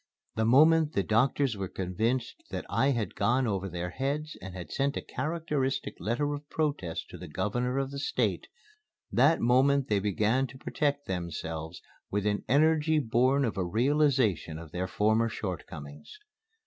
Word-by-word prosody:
The 110 Hz, -, 0 dB
moment 155 Hz, +5 st, +5 dB
the 100 Hz, -, +1 dB
doctors 125 Hz, +3 st, +2 dB
were 95 Hz, -1 st, -3 dB
convinced 115 Hz, -, -2 dB
that -, -, -4 dB
I 135 Hz, -, +3 dB
had 115 Hz, -9 st, -1 dB
gone 120 Hz, +6 st, +2 dB
over 95 Hz, -3 st, -1 dB
their 90 Hz, 0 st, -4 dB
heads 145 Hz, -, -2 dB
and 95 Hz, 0 st, -8 dB
had 90 Hz, -1 st, -8 dB
sent 140 Hz, +1 st, 0 dB
a -, -, -2 dB
characteristic 150 Hz, -8 st, -2 dB
letter 130 Hz, -, -1 dB
of 145 Hz, 0 st, -7 dB
protest 145 Hz, -, -2 dB
to -, -, -9 dB
the 90 Hz, -, -8 dB
Governor 120 Hz, -, -1 dB
of 135 Hz, 0 st, -1 dB
the 140 Hz, -, -5 dB
State, 145 Hz, -, -1 dB, 0.6 s
that 165 Hz, -, +4 dB
moment 130 Hz, +3 st, +3 dB
they 105 Hz, -2 st, +3 dB
began 105 Hz, +6 st, +1 dB
to 130 Hz, +2 st, -12 dB
protect 145 Hz, +1 st, -1 dB
themselves 80 Hz, -2 st, -5 dB, 0.3 s
with 105 Hz, 0 st, -1 dB
an 105 Hz, -1 st, 0 dB
energy 155 Hz, +3 st, +4 dB
born 130 Hz, +1 st, +2 dB
of 115 Hz, -, -3 dB
a -, -, +1 dB
realization 120 Hz, -, +1 dB
of 80 Hz, -2 st, -10 dB
their 90 Hz, +2 st, -2 dB
former 110 Hz, +3 st, +2 dB
shortcomings. 75 Hz, -, -7 dB
120 Hz, 160 wpm, -29 LUFS, 95-140 Hz, 0.6 s, moment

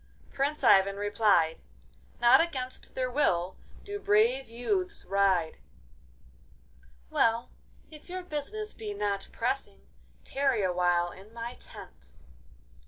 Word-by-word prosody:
Prince 280 Hz, +2 st, -1 dB
Ivan 195 Hz, 0 st, +5 dB
replied, 205 Hz, -5 st, +2 dB, 0.6 s
'Not 240 Hz, +4 st, +7 dB
against 260 Hz, -6 st, -4 dB
their 255 Hz, -1 st, -1 dB
will 185 Hz, -10 st, +1 dB, 0.3 s
do 410 Hz, 0 st, -5 dB
brave 235 Hz, -, +2 dB
youths 365 Hz, -, -2 dB
ride!' 190 Hz, -4 st, +1 dB, 1.5 s
'Well, 230 Hz, +1 st, +1 dB, 0.4 s
if 305 Hz, +3 st, -13 dB
your 370 Hz, 0 st, -5 dB
business 365 Hz, +7 st, -4 dB
be 210 Hz, -2 st, -6 dB
not 200 Hz, -1 st, -2 dB
pressing, 65 Hz, -, -3 dB, 0.4 s
tarry 270 Hz, -6 st, 0 dB
awhile 175 Hz, -1 st, +1 dB
in 195 Hz, +4 st, -14 dB
my 235 Hz, +1 st, -5 dB
tent. 65 Hz, -, -13 dB
230 Hz, 105 wpm, -29 LUFS, 195-280 Hz, 1.5 s, Not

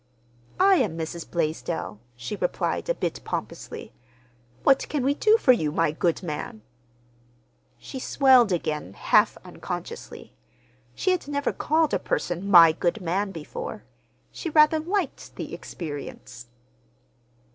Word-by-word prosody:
"I 385 Hz, 0 st, +6 dB
am 200 Hz, -, 0 dB
Mrs. 165 Hz, +1 st, -5 dB
Blaisdell," 125 Hz, -, -3 dB, 0.2 s
she 120 Hz, -, -5 dB
replied 185 Hz, -, -2 dB
a -, -, +2 dB
bit -, -, -3 dB
pompously. 220 Hz, -, -6 dB, 0.7 s
"What 270 Hz, -1 st, +3 dB
can 290 Hz, -4 st, -1 dB
we 275 Hz, +2 st, +2 dB
do 430 Hz, +9 st, +4 dB
for 270 Hz, -, +5 dB
you, 155 Hz, -12 st, +1 dB
my 165 Hz, 0 st, +1 dB
good 170 Hz, +3 st, -1 dB
man?" 150 Hz, -9 st, -5 dB, 1.1 s
She 265 Hz, -, -8 dB
swelled 255 Hz, -5 st, +4 dB
again, 150 Hz, -, -2 dB
half -, -, +3 dB
unconsciously. -, -, -7 dB, 0.6 s
She 375 Hz, -, +1 dB
had 365 Hz, -5 st, -1 dB
never 285 Hz, 0 st, -1 dB
called 315 Hz, 0 st, +1 dB
a -, -, +2 dB
person 175 Hz, +3 st, -2 dB
"my 170 Hz, -4 st, +9 dB
good 175 Hz, +5 st, -1 dB
man" 190 Hz, +3 st, -1 dB
before. 160 Hz, -5 st, -7 dB, 0.5 s
She 335 Hz, -, -5 dB
rather 305 Hz, 0 st, +5 dB
liked 355 Hz, 0 st, -3 dB
the -, -, -6 dB
experience. 140 Hz, -6 st, -8 dB
185 Hz, 130 wpm, -25 LUFS, -, 1.1 s, my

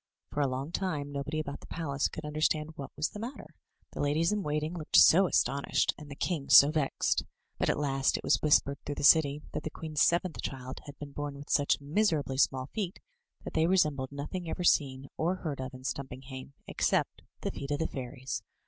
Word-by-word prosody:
For 145 Hz, -, -1 dB
a 140 Hz, -, +3 dB
long 135 Hz, +4 st, -4 dB
time 155 Hz, -6 st, -2 dB
nobody 145 Hz, +2 st, -3 dB
about 140 Hz, -2 st, -5 dB
the -, -, -14 dB
palace 145 Hz, -4 st, -1 dB
could 155 Hz, -, -8 dB
imderstand 150 Hz, +1 st, 0 dB
what 140 Hz, -4 st, -7 dB
was 150 Hz, -, 0 dB
the 210 Hz, -, -9 dB
matter 235 Hz, +5 st, -7 dB, 0.2 s
— -, -, -41 dB
the -, -, -4 dB
ladies 155 Hz, +5 st, +2 dB
in 210 Hz, -1 st, 0 dB
waiting 150 Hz, 0 st, -2 dB
looked 155 Hz, -3 st, -4 dB
so 185 Hz, +3 st, +8 dB
astonished, 140 Hz, -4 st, +1 dB
and 150 Hz, -1 st, -11 dB
the 140 Hz, -, -7 dB
king 155 Hz, -2 st, -2 dB
so 140 Hz, +2 st, +9 dB
vexed; 150 Hz, -3 st, 0 dB, 0.4 s
but -, -, +1 dB
at -, -, +1 dB
last 135 Hz, -2 st, +1 dB
it -, -, -8 dB
was -, -, +2 dB
whispered 140 Hz, -2 st, +3 dB
through 145 Hz, -, -4 dB
the -, -, -5 dB
city 150 Hz, -1 st, +5 dB
that -, -, -3 dB
the 155 Hz, -, -4 dB
queen's 155 Hz, -1 st, -3 dB
seventh 170 Hz, -1 st, +2 dB
child 130 Hz, -1 st, -6 dB
had 145 Hz, -, -10 dB
been 145 Hz, -1 st, -8 dB
bom 145 Hz, 0 st, -5 dB
with 140 Hz, +1 st, -9 dB
such 145 Hz, -1 st, +3 dB
miserably 145 Hz, -3 st, 0 dB
small 130 Hz, -2 st, +2 dB
feet 195 Hz, -4 st, -3 dB, 0.4 s
that -, -, -7 dB
they 160 Hz, +1 st, +3 dB
resembled 150 Hz, -8 st, +2 dB
nothing 160 Hz, +5 st, -5 dB
ever 180 Hz, -, -3 dB
seen 135 Hz, -5 st, +2 dB
or 170 Hz, +4 st, +1 dB
heard 155 Hz, -7 st, -5 dB
of 130 Hz, 0 st, -5 dB
in 130 Hz, -1 st, -11 dB
Stimipinghame, 130 Hz, 0 st, -6 dB
except -, -, 0 dB, 0.2 s
the -, -, -2 dB
feet 140 Hz, -, -7 dB
of 145 Hz, -, 0 dB
the 160 Hz, -, -1 dB
fairies. 130 Hz, 0 st, -5 dB
145 Hz, 210 wpm, -30 LUFS, 140-160 Hz, 0.4 s, so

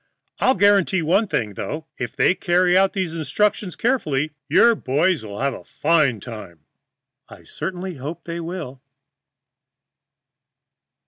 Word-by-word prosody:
I'll 260 Hz, -, +3 dB
guarantee 195 Hz, -2 st, +3 dB
one 195 Hz, +8 st, +2 dB
thing, 110 Hz, -, -2 dB
though, 155 Hz, +10 st, -5 dB
if 120 Hz, -2 st, -5 dB
they -, -, +3 dB
carry 180 Hz, -1 st, +2 dB
out 190 Hz, +1 st, +4 dB
these 185 Hz, -4 st, -2 dB
instructions 185 Hz, +5 st, -1 dB
carefully, 155 Hz, -, 0 dB, 0.2 s
your 235 Hz, +10 st, +6 dB
boy 150 Hz, -, +1 dB
friends 175 Hz, -10 st, -1 dB
will 105 Hz, -1 st, -8 dB
have 140 Hz, 0 st, +1 dB
a -, -, -10 dB
fine 150 Hz, -7 st, +1 dB
time." 100 Hz, -8 st, -10 dB, 0.7 s
I -, -, -14 dB
certainly 180 Hz, +1 st, -5 dB
hope 145 Hz, +6 st, -7 dB
they 170 Hz, 0 st, -5 dB
will. 165 Hz, -6 st, -6 dB
165 Hz, 135 wpm, -22 LUFS, 135-190 Hz, 0.7 s, your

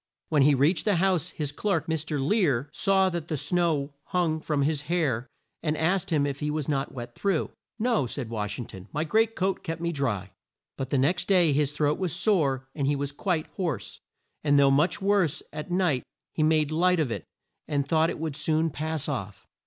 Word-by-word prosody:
When 150 Hz, -3 st, +3 dB
he 140 Hz, +1 st, +5 dB
reached 150 Hz, +6 st, +2 dB
the 210 Hz, -3 st, +3 dB
house 180 Hz, -2 st, +2 dB
his 150 Hz, -3 st, -3 dB
clerk, 200 Hz, +6 st, -1 dB
Mr. 160 Hz, -2 st, -2 dB
Lear, 145 Hz, -, +1 dB
saw 190 Hz, -1 st, +3 dB
that 170 Hz, -2 st, -4 dB
the 155 Hz, -, -2 dB
snow 155 Hz, -3 st, 0 dB
hung 170 Hz, -3 st, 0 dB
from 150 Hz, -2 st, 0 dB
his 150 Hz, 0 st, 0 dB
hair, 140 Hz, -9 st, 0 dB, 0.3 s
and 155 Hz, -1 st, -1 dB
asked 180 Hz, +3 st, +1 dB
him 150 Hz, -3 st, +2 dB
if 140 Hz, -1 st, -3 dB
he 150 Hz, -, -1 dB
was 150 Hz, -2 st, -2 dB
not 140 Hz, -2 st, -1 dB
wet 120 Hz, -2 st, -7 dB
through. 195 Hz, -1 st, 0 dB, 0.3 s
"No," 230 Hz, -, +1 dB
said 125 Hz, 0 st, -4 dB
Wash 105 Hz, -2 st, -3 dB
ing 120 Hz, -, -5 dB
ton, 95 Hz, -1 st, -11 dB
"my 150 Hz, -, -1 dB
great 220 Hz, +7 st, +2 dB
coat 190 Hz, +1 st, 0 dB
kept 165 Hz, -2 st, -4 dB
me 170 Hz, 0 st, -1 dB
dry." 110 Hz, -, -2 dB, 0.4 s
But 135 Hz, -1 st, -4 dB
the 140 Hz, -, +1 dB
next 175 Hz, +7 st, +1 dB
day 175 Hz, -6 st, +5 dB
his 145 Hz, 0 st, +1 dB
throat 150 Hz, 0 st, 0 dB
was 185 Hz, -4 st, -1 dB
sore 140 Hz, -, +1 dB
and 140 Hz, -3 st, -1 dB
he 145 Hz, -, +2 dB
was 140 Hz, 0 st, -3 dB
quite 160 Hz, +1 st, -1 dB
hoarse; 160 Hz, -, -3 dB, 0.4 s
and 145 Hz, -1 st, +4 dB
though 140 Hz, -1 st, +6 dB
much 165 Hz, +8 st, +2 dB
worse 195 Hz, -7 st, +2 dB
at 150 Hz, +3 st, -6 dB
night 175 Hz, -8 st, +2 dB, 0.3 s
he -, -, -1 dB
made 155 Hz, -1 st, +3 dB
light 180 Hz, +2 st, +3 dB
of 145 Hz, -7 st, 0 dB
it -, -, -3 dB, 0.4 s
and 145 Hz, -2 st, 0 dB
thought 160 Hz, +1 st, +3 dB
it -, -, -4 dB
would 155 Hz, -2 st, -3 dB
soon 155 Hz, +2 st, +1 dB
pass 155 Hz, -1 st, -3 dB
off. 100 Hz, -, -5 dB
155 Hz, 210 wpm, -27 LUFS, 140-175 Hz, 0.4 s, though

